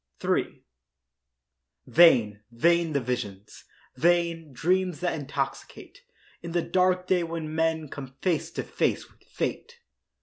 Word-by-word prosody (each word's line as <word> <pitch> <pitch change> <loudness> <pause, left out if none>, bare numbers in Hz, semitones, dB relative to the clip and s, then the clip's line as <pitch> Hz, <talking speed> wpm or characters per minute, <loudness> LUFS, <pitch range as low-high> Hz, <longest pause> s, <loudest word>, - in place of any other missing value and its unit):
III - - -1 1.2
Vain, 120 -12 +5
vain 165 +7 +2
the 140 - +2
visions—vain, 140 - -2
Dreams 180 +5 0
that 180 -1 -1
intoxicate 145 -4 -5 0.4
In 170 -1 -7
the 175 -1 +1
dark 185 0 +1
day 185 -1 +2
when 165 -2 -4
men 160 -1 0
Come 135 -1 -9
face 175 -5 0
to - - -3
face - - -1
with - - -29
fate. - - -5
165 Hz, 115 wpm, -26 LUFS, 135-175 Hz, 1.2 s, Vain